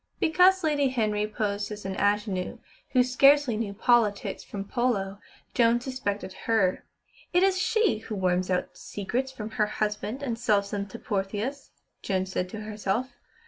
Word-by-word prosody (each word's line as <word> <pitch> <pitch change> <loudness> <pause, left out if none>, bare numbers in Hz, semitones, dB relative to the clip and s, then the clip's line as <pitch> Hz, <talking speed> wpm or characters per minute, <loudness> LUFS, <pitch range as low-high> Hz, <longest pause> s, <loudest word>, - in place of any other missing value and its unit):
Because 365 +3 +4
Lady 295 -3 +2
Henry 215 -4 0
posed 210 -1 -2
as 210 -1 -7
an 195 - -2
ingénue, 205 -2 0 0.4
who 255 -2 +6
scarcely 275 0 +5
knew 215 -2 -2
politics 220 -3 +2
from 200 -1 -6
polo, 205 -5 -1 0.3
Joan 235 -1 +4
suspected 225 -7 -4
her. 210 -5 +2 0.5
"It 355 +1 +4
is 380 -1 +3
she 435 - +2
who 220 0 -6
worms 185 -1 +1
out 180 -1 -1
secrets 245 +7 -3
from 220 -4 -7
her 210 - +4
husband 210 +4 -2
and 235 -4 -2
sells 205 -4 +1
them 200 -1 -2
to 230 - -9
Portheous," 210 +7 -3 0.3
Joan 190 -1 0
said 185 -1 -3
to 215 +3 -6
herself. 215 +4 -2
215 Hz, 155 wpm, -27 LUFS, 200-255 Hz, 0.5 s, who